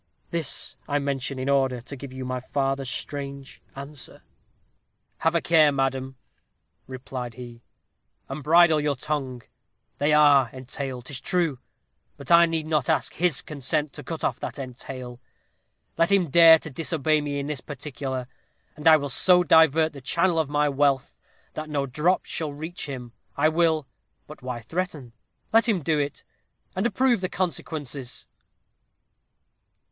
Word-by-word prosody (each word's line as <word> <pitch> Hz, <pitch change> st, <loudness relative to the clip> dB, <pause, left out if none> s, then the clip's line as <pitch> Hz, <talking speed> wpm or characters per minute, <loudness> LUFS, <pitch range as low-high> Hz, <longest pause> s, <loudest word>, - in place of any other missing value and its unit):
This 165 Hz, -4 st, -1 dB
I 145 Hz, -, 0 dB
mention 140 Hz, -1 st, -2 dB
in 130 Hz, +1 st, -3 dB
order 135 Hz, -2 st, +2 dB
to 125 Hz, +4 st, -9 dB
give 140 Hz, 0 st, -9 dB
you 130 Hz, 0 st, -6 dB
my 130 Hz, 0 st, -3 dB
father's 135 Hz, 0 st, -2 dB
strange 140 Hz, +1 st, -5 dB
answer. 140 Hz, 0 st, -8 dB, 1.0 s
"'Have 160 Hz, +1 st, +1 dB
a 170 Hz, -, +3 dB
care, 155 Hz, -3 st, +5 dB
madam,' 135 Hz, -1 st, -1 dB, 0.7 s
replied 130 Hz, -2 st, -6 dB
he, 120 Hz, -2 st, -10 dB, 0.7 s
'and 135 Hz, +3 st, -6 dB
bridle 160 Hz, +1 st, +5 dB
your 145 Hz, -1 st, 0 dB
tongue; 135 Hz, -3 st, -4 dB, 0.6 s
they 145 Hz, +2 st, +2 dB
are 145 Hz, -4 st, +5 dB
entailed, 130 Hz, -1 st, -6 dB
'tis 140 Hz, -2 st, -4 dB
true, 170 Hz, -8 st, 0 dB, 0.6 s
but -, -, -7 dB
I 170 Hz, 0 st, +7 dB
need 165 Hz, -1 st, -2 dB
not 155 Hz, +1 st, 0 dB
ask 160 Hz, -, +1 dB
his 170 Hz, -5 st, +1 dB
consent 150 Hz, -1 st, -2 dB
to -, -, -9 dB
cut 165 Hz, -2 st, -6 dB
off -, -, -1 dB
that -, -, -6 dB
entail. 125 Hz, -1 st, -7 dB, 0.8 s
Let 165 Hz, +3 st, +3 dB
him 185 Hz, -7 st, +3 dB
dare 165 Hz, 0 st, +9 dB
to 155 Hz, -1 st, -8 dB
disobey 155 Hz, +1 st, 0 dB
me 145 Hz, -1 st, -3 dB
in 140 Hz, -, -3 dB
this 145 Hz, -3 st, -4 dB
particular, 135 Hz, -2 st, -5 dB, 0.5 s
and 150 Hz, +1 st, -2 dB
I 160 Hz, -1 st, +9 dB
will 145 Hz, -1 st, -3 dB
so 180 Hz, +5 st, +4 dB
divert 160 Hz, -1 st, +4 dB
the 140 Hz, -, -10 dB
channel 170 Hz, +5 st, +1 dB
of 155 Hz, -3 st, 0 dB
my 150 Hz, 0 st, +2 dB
wealth, 140 Hz, -2 st, +1 dB, 0.4 s
that 155 Hz, 0 st, -6 dB
no 145 Hz, -2 st, -1 dB
drop 155 Hz, +8 st, +1 dB
shall 155 Hz, -3 st, -3 dB
reach 160 Hz, +3 st, -6 dB
him. 125 Hz, -3 st, -7 dB, 0.2 s
I 155 Hz, -, +4 dB
will 160 Hz, -2 st, +2 dB, 0.4 s
but -, -, -12 dB
why 125 Hz, -2 st, -5 dB
threaten? 150 Hz, -, -4 dB, 0.4 s
let 225 Hz, +1 st, +4 dB
him 190 Hz, -8 st, +1 dB
do 155 Hz, +1 st, +1 dB
it, 145 Hz, -1 st, -3 dB, 0.5 s
and 190 Hz, +5 st, +1 dB
approve 245 Hz, -4 st, +2 dB
the 185 Hz, -, -2 dB
consequences.' 145 Hz, -7 st, -4 dB
145 Hz, 155 wpm, -25 LUFS, 135-160 Hz, 1.0 s, dare